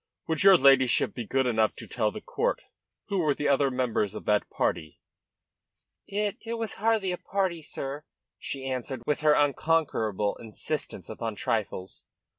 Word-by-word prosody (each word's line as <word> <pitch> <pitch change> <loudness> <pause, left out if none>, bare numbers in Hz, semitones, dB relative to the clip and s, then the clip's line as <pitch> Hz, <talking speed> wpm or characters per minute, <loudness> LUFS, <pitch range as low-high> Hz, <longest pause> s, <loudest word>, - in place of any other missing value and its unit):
"Would 160 -1 0
your 195 -1 +8
ladyship 130 -3 +4
be 120 -4 -6
good 135 0 +1
enough 110 -3 +2
to - - -8
tell - - 0
the - - -8
court - - -1 0.5
who 195 - 0
were 150 -4 +2
the 150 - -1
other 140 0 +3
members 125 -5 -1
of - - -7
that 105 -1 +1
party?" 80 -1 -2 1.1
"It 205 0 -1
it 230 +1 -3
was 225 -2 -3
hardly 220 -4 +2
a 180 - -3
party, 190 -4 -1
sir," 140 0 -6 0.4
she 135 -1 -5
answered, 130 -1 -4
with 150 - 0
her 150 -1 +5
unconquerable 140 -9 +1
insistence 110 -2 -5
upon 115 -2 -4
trifles. 95 -4 -3
135 Hz, 160 wpm, -28 LUFS, 115-170 Hz, 1.1 s, your